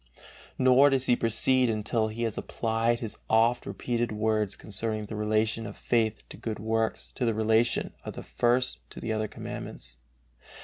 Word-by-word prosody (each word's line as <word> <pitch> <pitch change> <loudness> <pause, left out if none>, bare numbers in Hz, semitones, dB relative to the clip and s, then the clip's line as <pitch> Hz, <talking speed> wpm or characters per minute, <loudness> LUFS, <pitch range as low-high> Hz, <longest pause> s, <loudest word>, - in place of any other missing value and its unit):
Nor 130 +2 +6
does 135 -1 +1
he 120 - +4
proceed 120 +2 +3
until 110 +1 0
he 110 +2 -4
has 115 -2 -1
applied 115 +1 0
his 110 -3 -4
oft 115 +2 +3
repeated 120 -1 -2
words 110 -1 0
concerning 110 +1 -3
the 105 +1 -6
relation 110 +1 0
of 105 - -9
faith 110 -2 0
to - - -9
good 110 -2 -4
works 110 +1 -1
to 130 - -4
the 115 -2 +1
relation 110 +2 +2
of - - -6
the - - -8
First 120 +1 +1
to - - -9
the 110 - -2
other 110 0 -1
Commandments. 60 -9 -8
110 Hz, 170 wpm, -28 LUFS, 110-120 Hz, -, Nor